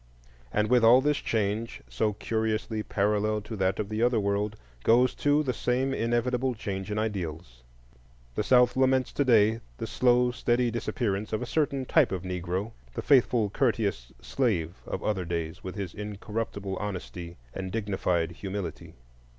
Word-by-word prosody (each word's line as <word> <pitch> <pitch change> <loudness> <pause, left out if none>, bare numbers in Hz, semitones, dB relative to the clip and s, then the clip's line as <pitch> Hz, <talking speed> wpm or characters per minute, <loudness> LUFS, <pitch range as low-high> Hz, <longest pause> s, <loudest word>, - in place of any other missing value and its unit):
And 105 0 +1
with 125 0 +4
all 120 +3 +8
this 145 +2 +1
change, 110 +1 -2
so 110 -1 0
curiously 110 0 -1
parallel 105 +1 +1
to 105 +2 -7
that 95 0 +1
of 105 - -1
the 110 +1 -2
Other 120 -1 +3
world, 100 +1 0 0.3
goes 125 +3 +4
too 145 +1 +2
the 130 -3 -1
same 130 +3 0
inevitable 125 +2 0
change 95 -2 -4
in 105 - -2
ideals. 85 - -4 0.7
The - - -1
South 125 -1 +4
laments 130 0 +2
to 145 - +1
day 115 -3 +4 0.2
the - - -4
slow, 125 0 +3
steady 120 0 +1
disappearance 110 -3 -2
of 110 - -1
a - - -3
certain 140 0 0
type 150 - +3
of 95 -2 -3
Negro,—the 90 - -4
faithful, 120 -6 +4
courteous 100 - 0
slave 90 - -1
of - - -4
other 100 -4 0
days, 85 -2 -4
with 95 - -6
his 100 -3 -4
incorruptible 105 -1 -4
honesty 90 -4 -6 0.2
and 95 -1 -5
dignified 95 -6 0
humility. 95 -2 -6
105 Hz, 155 wpm, -28 LUFS, 95-120 Hz, 0.7 s, all